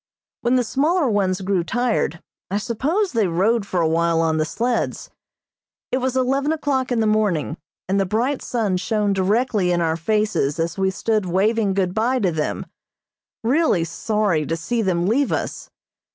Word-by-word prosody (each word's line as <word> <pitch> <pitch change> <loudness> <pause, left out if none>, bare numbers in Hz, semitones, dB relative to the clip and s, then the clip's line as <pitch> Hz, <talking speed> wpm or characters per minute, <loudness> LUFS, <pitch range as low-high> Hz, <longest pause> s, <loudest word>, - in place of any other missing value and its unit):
When 240 +2 +2
the 250 - +3
smaller 295 +7 +1
ones 195 -2 0
grew 190 -2 0
tired, 225 -3 -1 0.3
I 200 - 0
suppose 290 - -1
they 225 -6 +1
rode 200 +5 +1
for 185 - -1
a 165 - +2
while 165 +1 +2
on 160 -1 +1
the 155 - +1
sleds. 235 +8 -2 0.8
It 255 - +1
was 260 0 -1
eleven 270 +3 +1
o'clock 280 -5 -1
in 235 -2 +1
the - - +2
morning, 210 -8 +1 0.3
and 195 +2 +1
the 195 - +1
bright 245 +8 0
sun 215 -6 -1
shone 210 +1 0
directly 200 0 +1
in 175 - +1
our 160 -1 +1
faces 210 -5 0
as 165 +1 -1
we 190 -1 +1
stood 210 +1 -1
waving 200 +2 +1
good 185 -2 0
bye 235 +5 +1
to 195 -8 +1
them, 155 -2 -2 0.8
really 250 - +2
sorry 195 -1 0
to 165 - -1
see 225 +9 -1
them 175 -4 0
leave 255 +8 +1
us. - - -3
210 Hz, 175 wpm, -21 LUFS, 180-245 Hz, 0.8 s, the